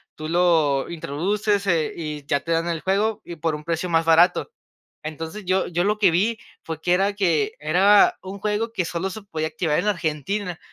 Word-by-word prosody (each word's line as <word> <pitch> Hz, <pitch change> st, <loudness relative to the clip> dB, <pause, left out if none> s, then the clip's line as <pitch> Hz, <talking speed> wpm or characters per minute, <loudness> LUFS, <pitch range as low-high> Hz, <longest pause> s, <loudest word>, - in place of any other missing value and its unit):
tú 155 Hz, -, -6 dB
lo 160 Hz, -5 st, +2 dB
introduces, 200 Hz, +7 st, -1 dB
eh, 165 Hz, -4 st, +1 dB
y 150 Hz, -3 st, -6 dB
ya 140 Hz, 0 st, 0 dB
te 165 Hz, -, -5 dB
dan 165 Hz, +1 st, +1 dB
el 165 Hz, -2 st, -2 dB
juego, 205 Hz, +3 st, 0 dB
y 170 Hz, -, -9 dB
por 160 Hz, 0 st, -1 dB
un 150 Hz, -, -9 dB
precio 170 Hz, +2 st, -2 dB
más 165 Hz, -1 st, +2 dB
barato. 170 Hz, -, +4 dB, 0.5 s
Entonces, 160 Hz, +6 st, -6 dB
yo 185 Hz, +1 st, +1 dB
yo 175 Hz, 0 st, -1 dB
lo 210 Hz, +1 st, 0 dB
que 195 Hz, -5 st, +5 dB
vi 210 Hz, +7 st, +1 dB, 0.3 s
fue 160 Hz, -1 st, -6 dB
que 175 Hz, +2 st, +2 dB
era 195 Hz, +3 st, +2 dB
que 170 Hz, -8 st, +1 dB
era 190 Hz, +7 st, +4 dB
un 190 Hz, +1 st, -8 dB
juego 215 Hz, +3 st, -2 dB
que 190 Hz, -5 st, 0 dB
solo 175 Hz, +3 st, -3 dB
se 215 Hz, +4 st, -8 dB
podía 155 Hz, -5 st, -3 dB
activar 155 Hz, -1 st, -1 dB
en -, -, -2 dB
Argentina, 180 Hz, +1 st, -2 dB
175 Hz, 200 wpm, -23 LUFS, 160-200 Hz, 0.5 s, que